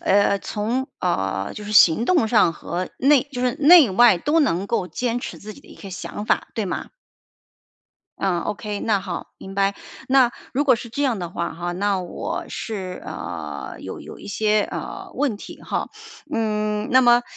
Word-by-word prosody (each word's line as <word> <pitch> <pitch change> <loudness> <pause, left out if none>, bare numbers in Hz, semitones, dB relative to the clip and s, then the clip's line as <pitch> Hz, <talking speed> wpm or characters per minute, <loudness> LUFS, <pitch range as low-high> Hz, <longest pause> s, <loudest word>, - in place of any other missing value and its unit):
呃， 200 0 +3
从 230 +7 -2
呃， 95 - -1
就 210 - -7
是 210 - -5
行 215 +1 +6
动 320 -10 +3
上 210 -7 +4
和 175 +3 -4
内 275 0 +5
就 250 - -4
是 250 -1 +1
内 300 - +7
外 220 -2 +6
都 295 - +1
能 195 - +1
够 195 -4 -1
坚 245 +2 -1
持 - - -7
自 215 +1 -9
己 280 - -15
的 - - -20
一 - - -13
个 195 - -10
想 205 +3 -6
法， - - +1
对 215 -3 -1
吗？ - - -4 1.3
嗯 180 -3 0
，OK， 210 0 -4
那 210 -3 +1
好， 185 -3 -6
明 195 0 -9
白。 200 0 +2 0.3
那 260 -2 +5 0.2
如 285 +3 +1
果 255 -4 +5
是 235 - -8
这 285 +5 -2
样 250 -7 +1
的 175 -2 -5
话 170 -1 -3
哈， 175 +1 -4
那 195 +1 0
我 180 - -4
是 190 -5 -5
呃， - - -6
有 - - -7
有 - - -10
一 - - -11
些， 210 +1 +2
呃， - - -6
问 270 -8 0
题 - - -10
哈。 - - -3 0.4
嗯， 210 -1 -1
那 255 - +6
么 240 -1 +5
210 Hz, 205 characters per minute, -22 LUFS, 190-245 Hz, 1.3 s, 内